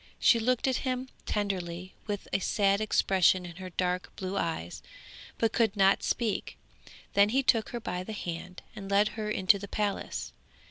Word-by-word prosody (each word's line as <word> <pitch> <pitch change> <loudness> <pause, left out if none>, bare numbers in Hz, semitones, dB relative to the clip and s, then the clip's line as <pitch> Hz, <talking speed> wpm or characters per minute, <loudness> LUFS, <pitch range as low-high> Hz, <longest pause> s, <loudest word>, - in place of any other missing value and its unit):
She 235 - +5
looked 250 +3 +1
at 260 - +2
him 255 0 -2 0.2
tenderly 185 -3 -3
and - - -31
with 205 -2 -4
a - - +3
sad 200 +1 +2
expression 190 -3 +3
in 175 -1 -9
her 185 -1 -7
dark 180 +1 -1
blue 190 +1 -4
eyes, 160 - -3 0.6
but 225 -1 +1
could 225 -4 +2
not 195 0 +5
speak. 230 -4 -1 0.6
Then 200 +1 +5
he 265 +4 +2
took 225 -4 +3
her 240 - -4
by 180 -5 -4
the 220 - -6
hand 180 -1 -6
and 195 -2 -7
led 200 +1 +4
her 215 -1 -4
into 200 -1 +3
the 200 - -7
palace. 205 0 -3
200 Hz, 180 wpm, -29 LUFS, 185-220 Hz, 0.6 s, She